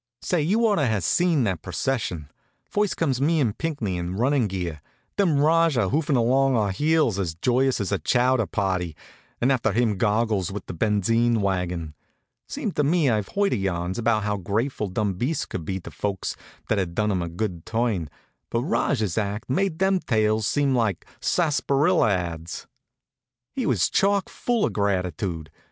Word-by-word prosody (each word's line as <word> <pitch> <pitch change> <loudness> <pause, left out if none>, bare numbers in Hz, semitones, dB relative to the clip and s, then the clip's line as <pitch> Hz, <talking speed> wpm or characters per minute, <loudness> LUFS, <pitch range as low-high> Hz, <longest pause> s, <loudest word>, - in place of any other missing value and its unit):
Say, 175 -3 +1
you 210 +10 +2
ought 210 -2 +3
to 145 -4 +2
have 110 -5 0
seen 170 - +2
that 95 -7 -1
procession. 90 - -3 0.3
First 205 -1 -1
comes 135 -6 0
me 160 +3 +2
and 115 -8 +1
Pinckney, 140 - -2
in 90 +1 -4
running 125 +2 +2
gear; 90 -6 -4 0.3
then 180 -8 +2
Rajah, 155 - +3
hoofing 145 0 +1
along 130 +3 +3
at - - +3
our 105 -2 +1
heels, 150 -3 +2
as 85 -4 -2
joyous 130 +7 +1
as 100 -1 -2
a 100 - +1
chowder 125 -3 +2
party; 95 -5 -1 0.4
and 125 +3 +2
after 125 -5 +1
him 110 -2 +1
Goggles, 105 -3 +1
with 100 -1 -6
the - - -6
benzine 110 +5 +2
wagon. 90 -5 -2 0.5
Seems 250 -9 -3
to 150 - +1
me 150 -2 +3
I've 105 -3 0
heard 200 0 +1
yarns 95 0 -2
about 115 -2 +1
how 105 -1 -1
grateful 105 +5 -2
dumb 100 +1 -1
beasts 150 +6 -1
could 85 -4 -6
be 95 +3 -3
to - - -9
folks 100 -2 -3 0.3
that 105 - +1
had 85 -3 -3
done 105 +1 +1
'em 95 -2 0
a 85 - -3
good 90 -1 -4
turn, 110 - -1 0.4
but 115 +1 -1
Rajah's 110 - 0
act 105 +4 -3
made 185 +3 0
them 190 +1 +2
tales 110 - +1
seem 140 -2 +1
like 110 -8 0
sarsaparilla 150 -3 +2
ads. 85 -3 -3 0.9
He 255 -4 -2
was - - +2
chock 200 -1 +1
full 240 -3 0
of - - -2
gratitude. 90 -5 -2
110 Hz, 175 wpm, -24 LUFS, 95-145 Hz, 0.9 s, ought